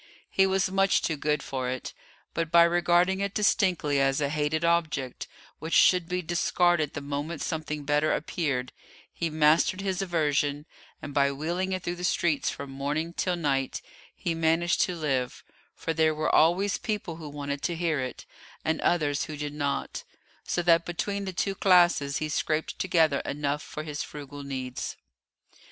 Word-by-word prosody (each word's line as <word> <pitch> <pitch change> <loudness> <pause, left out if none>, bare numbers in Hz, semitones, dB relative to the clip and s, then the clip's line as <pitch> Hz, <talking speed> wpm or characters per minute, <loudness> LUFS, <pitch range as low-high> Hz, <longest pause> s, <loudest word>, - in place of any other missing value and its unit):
He 195 0 +4
was 190 -1 +1
much 195 0 +3
too 160 - 0
good 150 0 -1
for 130 -2 -3
it, 130 0 -5 0.4
but 165 -1 -1
by 170 0 +8
regarding 175 +2 +3
it 200 0 -2
distinctly 180 -8 +2
as 135 +1 +2
a 140 -1 0
hated 150 +2 0
object 155 -6 0 0.3
which 160 +1 -2
should 180 -2 +5
be 180 0 -1
discarded 175 -2 +1
the 145 - -3
moment 145 +3 -4
something 150 -2 -3
better 150 +2 +2
appeared, 140 -6 -1 0.4
he 170 - -2
mastered 155 +4 +3
his 195 -1 -2
aversion, 150 -5 0 0.4
and, 145 - -6
by 140 0 +3
wheeling 170 +7 -2
it 185 -1 -2
through 175 0 -3
the 180 - -7
streets 170 -4 +1
from 140 -1 -6
morning 145 +5 -2
till 180 +1 0
night, 140 -5 -1 0.4
he 170 - -2
managed 165 +2 +2
to 180 - +1
live, 135 -6 -2 0.3
for 165 - -3
there 160 -1 +2
were 155 - 0
always 185 +6 +3
people 205 -7 -3
who 155 -3 -8
wanted 145 -1 -4
to 170 - -1
hear 165 -3 0
it, 130 -1 -5 0.4
and 160 0 0
others 150 -4 +1
who 155 - -7
did 145 0 -4
not, 145 -1 -2 0.4
so 175 - -1
that 170 -1 +5
between 200 +4 -3
the 190 - -3
two 195 +2 -1
classes 175 -8 +4
he 155 - -2
scraped 155 +1 -1
together 160 -6 +3
enough 145 +1 -2
for 155 - -7
his 150 -1 -4
frugal 145 -1 -8
needs. 130 -2 -5
160 Hz, 170 wpm, -27 LUFS, 145-175 Hz, 0.4 s, by